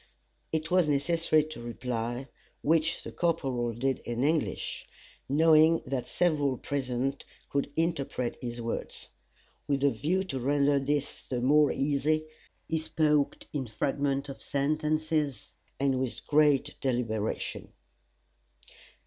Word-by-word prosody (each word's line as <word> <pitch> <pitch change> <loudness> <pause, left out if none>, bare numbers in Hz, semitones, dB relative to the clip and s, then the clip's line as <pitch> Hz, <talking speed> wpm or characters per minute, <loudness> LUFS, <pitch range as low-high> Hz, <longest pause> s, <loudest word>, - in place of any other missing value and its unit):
It 160 +1 -2
was 180 -3 +4
necessary 155 +2 +2
to 155 -5 -8
reply, 120 +1 -3 0.4
which 160 +1 +2
the - - -7
corporal 135 -8 0
did 130 +4 -1
in 120 +1 -3
English, 155 +2 -1 0.4
knowing 160 +2 +5
that 130 -1 -3
several 145 -7 +1
present 135 0 -2 0.3
could 140 0 -1
interpret 160 -7 -1
his 120 -1 -5
words. 115 0 -5 0.6
With 140 -1 0
a 140 - +5
view 180 +8 0
to 135 -8 -4
render 140 +2 +3
this 145 +1 -1
the 125 - -3
more 145 +4 +4
easy, 150 +2 +1 0.4
he 160 - 0
spoke 150 -2 +1
in 135 -4 -2
fragments 140 +5 -1
of 135 - -8
sentences, 155 -2 -1 0.3
and 135 -1 +2
with 130 -2 -2
great 150 -2 +3
deliberation. 115 -5 -2
140 Hz, 120 wpm, -29 LUFS, 130-155 Hz, 0.6 s, knowing